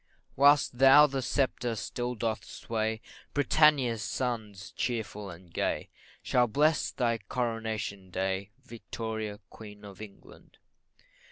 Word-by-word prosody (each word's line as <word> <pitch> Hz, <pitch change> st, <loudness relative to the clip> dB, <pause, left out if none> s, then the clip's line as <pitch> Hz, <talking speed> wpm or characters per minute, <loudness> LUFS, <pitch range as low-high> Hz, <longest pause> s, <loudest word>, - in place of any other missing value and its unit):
Whilst 140 Hz, -2 st, +4 dB
thou 135 Hz, +3 st, +8 dB
the 135 Hz, -2 st, -2 dB
sceptre 125 Hz, -3 st, 0 dB
still 120 Hz, +3 st, -4 dB
dost 115 Hz, -1 st, -2 dB
sway, 110 Hz, -1 st, -3 dB, 0.3 s
Britannia's 140 Hz, -5 st, +3 dB
sons, 105 Hz, -4 st, -4 dB
cheerful 105 Hz, -4 st, -3 dB
and 85 Hz, -1 st, -13 dB
gay, -, -, -1 dB, 0.3 s
Shall 125 Hz, -1 st, +3 dB
bless 150 Hz, +7 st, +2 dB
thy 115 Hz, -2 st, 0 dB
Coronation 110 Hz, -3 st, -3 dB
day, 95 Hz, +1 st, -2 dB, 0.2 s
Victoria, 110 Hz, -3 st, -5 dB
Queen 105 Hz, -1 st, -12 dB
of 100 Hz, 0 st, -11 dB
England. 105 Hz, -2 st, -14 dB
115 Hz, 110 wpm, -29 LUFS, 105-125 Hz, 0.3 s, thou